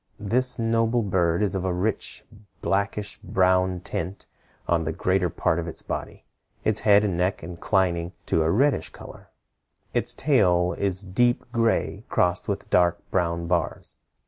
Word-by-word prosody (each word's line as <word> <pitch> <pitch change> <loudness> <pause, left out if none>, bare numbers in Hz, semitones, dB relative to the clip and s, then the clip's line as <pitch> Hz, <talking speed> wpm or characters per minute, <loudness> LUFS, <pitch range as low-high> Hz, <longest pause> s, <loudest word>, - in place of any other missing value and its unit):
This 125 +5 0
noble 115 0 +1
bird 90 -2 +1
is 100 - +1
of 95 -2 -2
a 95 - 0
rich 95 +5 -2 0.4
blackish 100 +1 -1
brown 95 -2 +2
tint 95 +2 -5 0.4
on 85 -1 +2
the 80 - -2
greater 90 +2 +1
part 85 0 0
of 85 - -4
its 80 - -6
body, - - -6 0.4
its 110 -1 +1
head 105 -1 +5
and 100 -4 0
neck 90 +1 -1
inclining 85 0 0
to 80 - +1
a 80 - +2
reddish 110 - +2
color. - - -13 0.6
Its - - 0
tail 90 - +3
is 95 0 -1
deep 120 +6 +1
gray 115 -2 0
crossed 90 0 +1
with - - -3
dark 85 -1 +4
brown 85 -2 0
bars. 85 -2 -2
95 Hz, 150 wpm, -25 LUFS, 85-105 Hz, 0.6 s, head